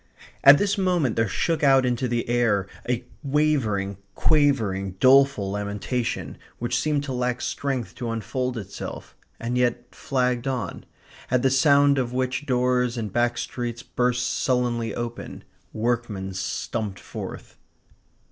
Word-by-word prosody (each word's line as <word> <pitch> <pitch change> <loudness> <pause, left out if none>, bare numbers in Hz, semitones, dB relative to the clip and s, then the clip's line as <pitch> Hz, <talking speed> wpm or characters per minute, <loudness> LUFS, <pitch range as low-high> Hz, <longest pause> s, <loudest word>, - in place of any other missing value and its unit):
At 140 +1 +10
this 205 +2 0
moment 175 - +1
there 115 0 +2
shook 160 - -1
out 135 -2 +5
into 125 +1 0
the 120 -1 -1
air 115 -5 +2 0.2
a 125 0 -1 0.2
wavering, 135 - 0 0.2
quavering, 110 -11 +2
doleful 135 -6 +5
lamentation 105 +4 -3 0.2
which 120 +1 -2
seemed 150 +1 0
to 140 -2 -4
lack 125 0 -1
strength 135 -5 -3
to 120 - -3
unfold 125 +3 -2
itself, 100 -3 -7 0.2
and 120 +2 -1
yet 120 0 -1
flagged 125 -1 -1
on; 130 -2 -3 0.4
at 125 0 +2
the 135 - +3
sound 140 0 +5
of 125 -1 -2
which 130 +2 -2
doors 125 -1 +1
in 110 -2 -3
back 120 +3 +1
streets 120 -1 -4
burst 125 0 0
sullenly 120 -3 0
open; 120 0 -6 0.3
workmen 110 -4 -2
stumped 100 +2 -3
forth. - - -8
125 Hz, 135 wpm, -24 LUFS, 115-135 Hz, 0.4 s, At